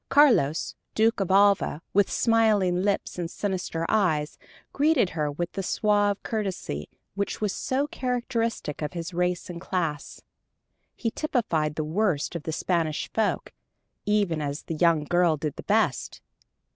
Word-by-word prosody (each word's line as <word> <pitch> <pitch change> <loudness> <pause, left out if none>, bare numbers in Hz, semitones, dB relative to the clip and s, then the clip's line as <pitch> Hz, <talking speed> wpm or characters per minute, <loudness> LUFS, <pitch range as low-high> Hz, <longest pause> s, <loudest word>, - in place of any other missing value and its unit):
Carlos, 250 - +4 0.2
Duke 225 +1 +3
of 195 - -1
Alva, 195 -4 +3
with 200 0 +4
smiling 210 -6 +3
lips 200 -2 -1
and 170 -1 -2
sinister 180 -4 -3
eyes, 160 -8 +1 0.3
greeted 285 - +3
her 150 -3 -1
with 170 +4 -3
the 195 - -3
suave 205 +1 +1
courtesy 190 - -3 0.2
which 200 0 -3
is 205 -2 0
so 270 +2 -1
characteristic 240 - -2
of 150 -2 -3
his 170 +1 -5
race 180 0 -1
and 170 -1 -7
class. 165 -6 -3 0.8
He 230 - -2
typified 170 - -1
the 155 - -1
worst 165 -1 0
of 170 - -3
the 160 - -4
Spanish 160 -2 -1
folk, 220 -2 -1 0.5
even 200 -7 +1
as 145 0 -3
the - - -4
young 165 -1 +3
girl 175 0 +2
did 150 -1 -3
the - - -7
best. - - +1
185 Hz, 145 wpm, -26 LUFS, 160-215 Hz, 0.8 s, Carlos